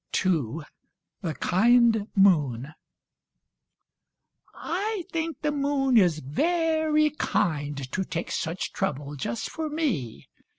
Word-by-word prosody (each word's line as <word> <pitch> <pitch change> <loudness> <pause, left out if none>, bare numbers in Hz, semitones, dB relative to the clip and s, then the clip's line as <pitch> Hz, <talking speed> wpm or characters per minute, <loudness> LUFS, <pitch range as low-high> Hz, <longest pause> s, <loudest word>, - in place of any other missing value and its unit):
II 160 -5 0 0.6
The 165 -4 -3
Kind 225 +2 +3
Moon 150 - +3 1.8
I 400 +2 -3
think 325 -3 -3
the 300 - +1
moon 280 -2 +1
is 180 -8 +5
very 315 - +1
kind 150 - -1
To 190 - -1
take 170 -2 -4
such 165 +3 -3
trouble 145 -6 -3
just 120 -3 -4
for 315 -1 -4
me. 255 - -2
205 Hz, 100 wpm, -26 LUFS, -, 1.8 s, is